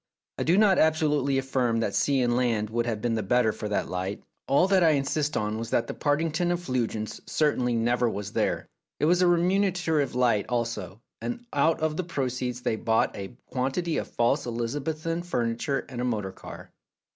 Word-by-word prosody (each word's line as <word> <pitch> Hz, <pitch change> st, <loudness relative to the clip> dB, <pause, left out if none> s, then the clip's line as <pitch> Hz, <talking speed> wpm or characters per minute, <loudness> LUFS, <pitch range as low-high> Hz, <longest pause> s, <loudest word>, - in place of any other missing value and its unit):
I -, -, +1 dB
do 170 Hz, +4 st, +3 dB
not 205 Hz, -3 st, +5 dB
absolutely 150 Hz, -3 st, +2 dB
affirm 130 Hz, -3 st, 0 dB
that 100 Hz, -, -1 dB
sea 140 Hz, -2 st, +2 dB
and 120 Hz, -1 st, +2 dB
land 115 Hz, -4 st, 0 dB
would 120 Hz, +1 st, 0 dB
have 110 Hz, -3 st, -3 dB
been 120 Hz, -1 st, +1 dB
the 110 Hz, -, 0 dB
better 110 Hz, +2 st, +2 dB
for 105 Hz, 0 st, -5 dB
that 105 Hz, -, -1 dB
light; 95 Hz, +3 st, -4 dB, 0.2 s
all 145 Hz, +7 st, +4 dB
that 190 Hz, -2 st, +4 dB
I 160 Hz, -2 st, +5 dB
insist 145 Hz, +1 st, 0 dB
on 105 Hz, +1 st, -1 dB
was 115 Hz, 0 st, -5 dB
that 115 Hz, -, +1 dB
the -, -, -5 dB
Partington 165 Hz, +4 st, 0 dB
effulgence 125 Hz, -10 st, -2 dB
certainly 130 Hz, -6 st, +1 dB
never 120 Hz, +1 st, +2 dB
was 105 Hz, -1 st, -5 dB
there. -, -, 0 dB, 0.3 s
It -, -, +2 dB
was 175 Hz, +3 st, +3 dB
a 180 Hz, -, +5 dB
re 175 Hz, -1 st, +4 dB
munerative 180 Hz, -7 st, +1 dB
light 120 Hz, -5 st, +2 dB
also, 115 Hz, -5 st, -3 dB, 0.2 s
and 240 Hz, 0 st, -4 dB
out 155 Hz, +3 st, +2 dB
of 155 Hz, -1 st, 0 dB
the 185 Hz, -, 0 dB
proceeds 125 Hz, -6 st, -3 dB
they 110 Hz, -, -1 dB
bought 110 Hz, 0 st, +1 dB
a 100 Hz, +5 st, -7 dB
quantity 135 Hz, +6 st, -1 dB
of -, -, -2 dB
false 125 Hz, +4 st, +1 dB
Elizabethan 145 Hz, +8 st, -2 dB
furniture 125 Hz, -3 st, -1 dB
and 125 Hz, -2 st, -5 dB
a -, -, -1 dB
motor 105 Hz, -6 st, -1 dB
car. -, -, -11 dB
125 Hz, 190 wpm, -27 LUFS, 115-155 Hz, 0.3 s, not